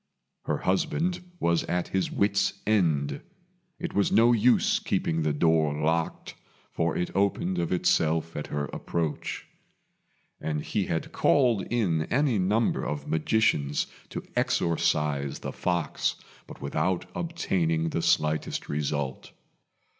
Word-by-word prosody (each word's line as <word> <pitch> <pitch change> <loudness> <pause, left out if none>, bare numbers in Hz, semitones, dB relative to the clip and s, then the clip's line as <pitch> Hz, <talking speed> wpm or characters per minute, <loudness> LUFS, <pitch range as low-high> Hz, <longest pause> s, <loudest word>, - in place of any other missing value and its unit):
Her - - 0
husband 165 - 0 0.2
was 85 -1 +2
at 90 0 -1
his 95 -1 -1
wits' 100 0 +1
end. 80 -9 +1 0.6
It - - -5
was 100 - +2
no 115 +2 +5
use 120 +1 +4
keeping 80 0 -1
the 75 -1 +1
door 75 -1 +2
locked, 80 +1 -1 0.4
for 80 0 0
it 90 - -3
opened 95 -2 +1
of 85 - -1
itself 85 -2 +1
at 75 - -4
her 75 0 -2
approach; 80 -3 -3 0.9
and 75 -1 -2
he 100 -3 -1
had 80 - -2
called 120 -9 +3
in 90 -10 +1
any 130 - +1
number 105 +5 +1
of 75 -1 -4
magicians 75 -4 +1 0.2
to - - -5
exorcise 75 -4 +1
the - - -6
fox, 85 -3 -1 0.3
but - - -11
without 90 -1 0
obtaining 85 - 0
the 85 - -1
slightest 80 -2 +1
result. 70 -2 -2
85 Hz, 125 wpm, -27 LUFS, 75-100 Hz, 0.9 s, no